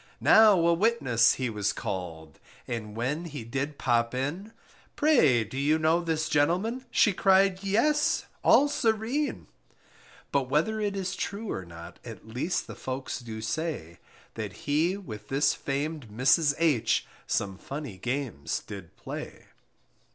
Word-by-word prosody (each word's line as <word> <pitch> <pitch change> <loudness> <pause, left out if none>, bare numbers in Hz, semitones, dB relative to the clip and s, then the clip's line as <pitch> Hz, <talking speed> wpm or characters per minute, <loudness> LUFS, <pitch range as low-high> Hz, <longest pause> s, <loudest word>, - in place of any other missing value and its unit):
Now 215 -3 +7
a 170 - +5
witness 155 - +3
he 130 - -2
was 105 -2 0
called, 80 -5 -6 0.3
And 110 -3 -5
when 140 +9 -2
he 150 -7 -6
did 140 +5 -3
pop 120 0 +1
in: 155 +12 -3 0.4
Pray, 250 - +4
do 115 +6 -6
you 150 +3 +3
know 160 +2 +2
this 160 -2 -1
gentleman? 185 - +1
She 205 - +4
cried, 190 0 +3
yes, 295 +10 +2 0.2
all 290 - +6
serene! 245 +1 -1 0.9
But 135 -2 0
whether 165 +10 +1
it 205 -1 -1
is 190 -2 -3
true 205 +1 -4
or 95 - -4
not, 85 0 -11
At - - -10
least 125 +11 -2
the - - -8
folks 130 0 -5
do 110 -3 -7
say, 115 - -4 0.3
That 105 -4 -5
he 160 +6 +1
with 110 - -9
this 140 +2 +2
famed 145 0 -3
Mrs. 135 +7 +3
H 155 -9 +2 0.2
Some 95 -2 -1
funny 140 -9 -7
games 125 - -3
did 95 -5 -9
play. - - -8
145 Hz, 145 wpm, -28 LUFS, 115-190 Hz, 0.9 s, Now